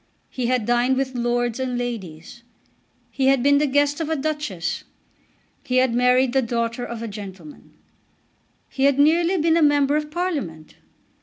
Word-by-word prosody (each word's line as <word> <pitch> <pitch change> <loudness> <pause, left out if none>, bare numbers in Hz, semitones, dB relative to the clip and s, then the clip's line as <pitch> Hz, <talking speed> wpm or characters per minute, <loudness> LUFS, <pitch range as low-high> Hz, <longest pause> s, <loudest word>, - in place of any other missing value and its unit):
He 250 -2 -2
had 250 -3 0
dined 240 +2 +2
with 265 -1 -2
lords 240 0 -1
and 255 -1 -2
ladies. 220 -5 -6 0.7
He 265 -1 0
had 270 -2 +3
been 285 0 +4
the 300 - +1
guest 285 +2 +1
of 320 - -3
a 320 - 0
Duchess. 270 - -3 0.8
He 255 - -3
had 255 -2 +3
married 250 +1 +3
the 265 - +3
daughter 235 0 -2
of 235 -1 -6
a - - -4
gentleman. 205 +7 -10 0.9
He 270 - -1
had 280 -1 +3
nearly 335 +5 +3
been 330 0 +2
a - - +2
member 290 -1 +3
of 300 0 -2
Parliament. 295 - -4
260 Hz, 165 wpm, -22 LUFS, 235-290 Hz, 0.9 s, been